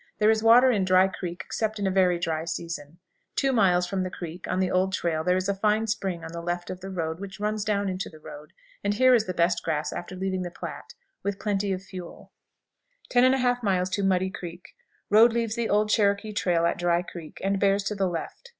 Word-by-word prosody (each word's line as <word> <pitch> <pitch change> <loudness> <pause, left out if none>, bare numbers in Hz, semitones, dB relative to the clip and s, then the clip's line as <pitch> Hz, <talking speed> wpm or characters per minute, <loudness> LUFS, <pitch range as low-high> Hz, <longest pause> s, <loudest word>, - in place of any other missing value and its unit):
There 215 +1 +4
is 220 0 +1
water 240 +3 +7
in 205 -5 +1
Dry 185 0 +5
Creek 180 -2 -6
except 220 -1 -2
in 200 - -2
a 190 - +1
very 185 -2 +3
dry 160 -2 -2
season. 165 -2 -5 0.4
Two 270 -1 +1
miles 180 -6 +3
from 190 +1 -2
the 185 - -2
creek, 175 0 -8
on 185 - -1
the 185 -1 +1
old 190 +1 +1
trail, 160 -3 -1
there 180 +2 +2
is 185 +1 -1
a 200 - +1
fine 210 +2 +1
spring 190 -6 -2
on 160 - -7
the 170 0 -6
left 175 +1 -3
of 185 - -7
the 190 +1 -8
road, 165 -3 -3
which 195 0 -8
runs 210 0 -1
down 205 -2 0
into 185 0 -3
the 155 - -14
road, 150 0 -11 0.3
and 205 0 0
here 255 +3 +5
is 225 -3 +4
the 185 - -3
best 170 +1 +2
grass 155 -2 -2
after 175 +2 -6
leaving 190 0 -2
the 180 - -4
Platte, 175 - -8 0.3
with 200 0 -2
plenty 200 -1 -1
of 190 0 -3
fuel. 185 -3 -10 0.8
10 250 +1 +5
1/2. 210 -7 +1
Muddy 190 0 +1
Creek. 175 -2 -8 0.4
Road 225 +3 +7
leaves 230 -2 -1
the 235 -2 -1
old 210 +1 +2
Cherokee 205 0 +2
trail 175 -4 +1
at 170 - 0
Dry 175 0 +2
Creek, 170 -3 -10
and 195 0 +1
bears 200 0 +2
to 195 - -2
the 195 -2 0
left. 175 - -6
190 Hz, 225 wpm, -26 LUFS, 175-210 Hz, 0.8 s, water